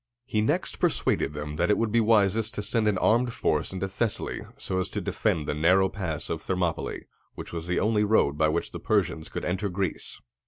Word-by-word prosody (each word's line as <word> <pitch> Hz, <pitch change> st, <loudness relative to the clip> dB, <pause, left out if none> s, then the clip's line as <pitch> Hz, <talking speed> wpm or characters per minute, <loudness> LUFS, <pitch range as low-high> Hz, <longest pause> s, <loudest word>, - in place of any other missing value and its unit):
He 110 Hz, -4 st, 0 dB
next 110 Hz, -, 0 dB
persuaded 75 Hz, -, +1 dB
them 75 Hz, 0 st, -5 dB
that 85 Hz, +3 st, +1 dB
it 105 Hz, -, +4 dB
would 115 Hz, -2 st, 0 dB
be 115 Hz, -, +4 dB
wisest 110 Hz, -1 st, +3 dB
to 105 Hz, -, -3 dB
send 110 Hz, +1 st, +1 dB
an 105 Hz, -3 st, +2 dB
armed 120 Hz, +5 st, +2 dB
force 75 Hz, -8 st, 0 dB
into 95 Hz, 0 st, -3 dB
Thessaly, 105 Hz, +3 st, -2 dB, 0.2 s
so 95 Hz, -, -2 dB
as 95 Hz, -, -1 dB
to -, -, -3 dB
defend 75 Hz, -, 0 dB
the -, -, 0 dB
narrow 90 Hz, +5 st, +4 dB
pass 85 Hz, -6 st, -4 dB
of 80 Hz, -, -2 dB
Thermopylæ, 90 Hz, -3 st, -2 dB, 0.3 s
which -, -, -8 dB
was 85 Hz, 0 st, -4 dB
the 90 Hz, -, +1 dB
only 105 Hz, 0 st, +2 dB
road 105 Hz, -9 st, +3 dB
by 80 Hz, +1 st, +3 dB
which -, -, -1 dB
the -, -, -6 dB
Persians 80 Hz, -, 0 dB
could -, -, -4 dB
enter 95 Hz, +3 st, -1 dB
Greece. 95 Hz, 0 st, -3 dB
95 Hz, 210 wpm, -27 LUFS, 80-110 Hz, 0.3 s, it